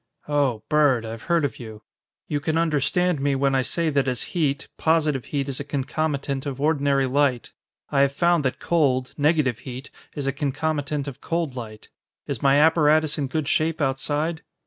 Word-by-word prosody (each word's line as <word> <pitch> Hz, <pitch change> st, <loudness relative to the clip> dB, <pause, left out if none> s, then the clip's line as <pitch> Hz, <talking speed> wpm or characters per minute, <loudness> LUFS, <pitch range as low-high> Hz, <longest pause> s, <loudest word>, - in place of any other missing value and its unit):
"Oh, 140 Hz, -7 st, 0 dB
Bird. 145 Hz, -6 st, +3 dB
I've 115 Hz, 0 st, -7 dB
heard 170 Hz, -3 st, +3 dB
of 130 Hz, -, -4 dB
you. 110 Hz, -3 st, -9 dB, 0.4 s
You 145 Hz, -, -1 dB
can 160 Hz, +2 st, -1 dB
understand 165 Hz, +1 st, +1 dB
me 140 Hz, 0 st, +1 dB
when 135 Hz, 0 st, +1 dB
I 135 Hz, -, +3 dB
say 165 Hz, +5 st, -1 dB
that 140 Hz, -2 st, +1 dB
as 125 Hz, -2 st, -1 dB
heat, 145 Hz, -6 st, 0 dB
positive 155 Hz, -5 st, +1 dB
heat 140 Hz, -2 st, -2 dB
is 135 Hz, -2 st, -3 dB
a -, -, -3 dB
concomitant 140 Hz, 0 st, -2 dB
of 135 Hz, -2 st, -5 dB
ordinary 140 Hz, -2 st, +2 dB
light. 130 Hz, -2 st, 0 dB, 0.4 s
I 140 Hz, -, +2 dB
have 140 Hz, 0 st, +4 dB
found 170 Hz, +2 st, +2 dB
that 130 Hz, -, -1 dB
cold, 130 Hz, -6 st, +1 dB
negative 145 Hz, -5 st, +2 dB
heat, 130 Hz, +1 st, -8 dB, 0.2 s
is 145 Hz, -, -4 dB
a 135 Hz, -, 0 dB
concomitant 145 Hz, 0 st, -2 dB
of 140 Hz, -, -8 dB
cold 165 Hz, -5 st, -2 dB
light. 110 Hz, -3 st, -8 dB, 0.4 s
Is -, -, -4 dB
my 135 Hz, 0 st, +4 dB
apparatus 155 Hz, 0 st, +4 dB
in 140 Hz, -, -1 dB
good 155 Hz, +1 st, -2 dB
shape 160 Hz, +2 st, +1 dB
outside?" 145 Hz, +3 st, -1 dB
145 Hz, 180 wpm, -24 LUFS, 135-155 Hz, 0.4 s, have